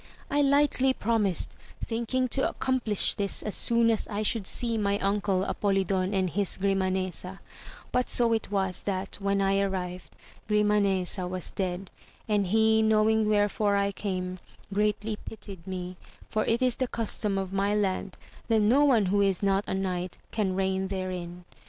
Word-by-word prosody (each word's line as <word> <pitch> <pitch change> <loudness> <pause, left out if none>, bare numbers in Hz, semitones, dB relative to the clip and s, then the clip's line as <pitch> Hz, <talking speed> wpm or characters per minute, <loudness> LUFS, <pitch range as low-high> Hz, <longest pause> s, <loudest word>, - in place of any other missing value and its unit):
I 290 +1 +3
lightly 280 -2 +3
promised, 210 -7 0 0.3
thinking 235 +3 -1
to 270 +2 +1
accomplish 245 -6 0
this 200 -1 -1
as 210 - -2
soon 235 -1 +3
as 220 - -1
I 210 0 -2
should 210 -2 +1
see 235 -2 +1
my 200 -1 +1
uncle 195 -1 0
Apolidon 195 -2 0
and 190 -2 +1
his 195 +2 -1
Gnmanesa; 190 -1 -1 0.5
but 250 0 0
so 235 -1 +3
it 225 - -1
was, 190 -2 -1
that, 195 -1 -3
when 200 0 +1
I 195 0 +2
arrived, 185 -2 -3 0.3
Grimanesa 200 -3 +2
was 180 -1 -5
dead, 185 -1 -3 0.4
and 205 -3 +1
he 220 +2 +4
knowing 220 0 +3
wherefore 205 0 +2
I 200 0 +1
came, 185 -2 -4 0.3
greatly 210 +1 0
pitied 195 -6 -10
me, 180 -1 -5 0.3
for 215 - 0
it 235 +3 +1
is 250 -2 +2
the 260 -2 0
custom 215 -3 -1
of 190 -1 -3
my 200 +1 +1
land 195 -2 -1 0.3
that 225 -2 +3
no 245 +8 +4
one 245 -8 +4
who 200 +2 +2
is 195 -1 +1
not 195 0 +2
a - - -1
knight 185 -2 -3
can 200 -4 0
reign 190 0 0
therein. 180 -2 -5
200 Hz, 160 wpm, -28 LUFS, 190-220 Hz, 0.5 s, he